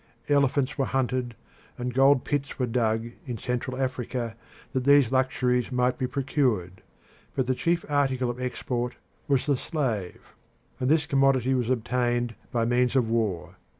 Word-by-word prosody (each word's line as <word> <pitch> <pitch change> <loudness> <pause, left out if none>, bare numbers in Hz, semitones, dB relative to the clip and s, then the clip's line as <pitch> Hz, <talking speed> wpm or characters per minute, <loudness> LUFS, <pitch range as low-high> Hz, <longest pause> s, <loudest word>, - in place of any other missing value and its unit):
Elephants 140 -1 +2
were 135 - +2
hunted 125 -2 -1 0.4
and 125 0 -3
gold 135 +1 +5
pits 145 -1 -2
were 125 - +1
dug 115 -1 0 0.2
in 120 -2 -3
Central 125 +2 -3
Africa, 125 -3 -2 0.4
that 130 - 0
these 140 -3 +5
luxuries 130 -1 +1
might 125 0 +1
be 130 - 0
procured; 125 - -1 0.5
but 130 - +1
the 130 - +1
chief 170 +6 0
article 135 -3 +1
of 125 +1 -8
export 125 -1 -3 0.3
was 135 -2 +2
the 145 -1 +2
slave, 125 - -3 0.5
and 125 - 0
this 155 -1 +3
commodity 135 -2 +3
was 125 -2 0
obtained 120 -1 0 0.2
by 115 -1 +1
means 125 +2 +2
of 120 -4 +2
war. 110 -7 -1
125 Hz, 150 wpm, -26 LUFS, 120-135 Hz, 0.5 s, gold